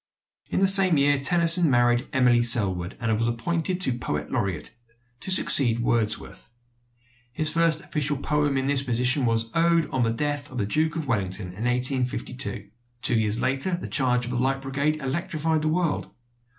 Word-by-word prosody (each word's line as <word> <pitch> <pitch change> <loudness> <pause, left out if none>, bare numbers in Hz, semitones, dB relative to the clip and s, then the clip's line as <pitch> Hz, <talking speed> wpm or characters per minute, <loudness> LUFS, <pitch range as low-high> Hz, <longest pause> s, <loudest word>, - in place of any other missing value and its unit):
In - - -1
the 195 - +4
same 190 -4 +6
year 145 0 +2
Tennyson 170 +3 +4
married 120 -1 +1
Emily 125 -2 +2
Sellwood, 100 -7 +2
and 115 -2 -1
was 115 - 0
appointed 160 +2 -2
poet 75 0 -4
laureate 100 -8 -3 0.5
to 190 - -5
succeed 135 -10 +4
Wordsworth. 115 -2 -2 0.9
His 155 -1 0
first 165 -1 +1
official 150 -5 -2
poem 145 0 -1
in 135 - -2
this 140 -1 +1
position 125 +1 0
was 115 0 0
the 165 - 0
"Ode 170 -1 +2
on 130 - -1
the 115 -1 +1
Death 145 +3 -3
of 130 - -9
the 105 - -1
Duke 155 +9 -1
of 160 -2 -4
Wellington" 100 -6 -3
in 100 +6 -7
1852. 125 -4 -3 0.3
Two - - +3
years 110 0 +1
later 135 +7 -1
"The - - -7
Charge 125 -3 0
of 120 - -6
the 120 - -2
Light 135 +1 -1
Brigade" 140 +3 -1
electrified 155 +2 -3
the 155 - -2
world. 165 0 -2
135 Hz, 175 wpm, -24 LUFS, 120-155 Hz, 0.9 s, same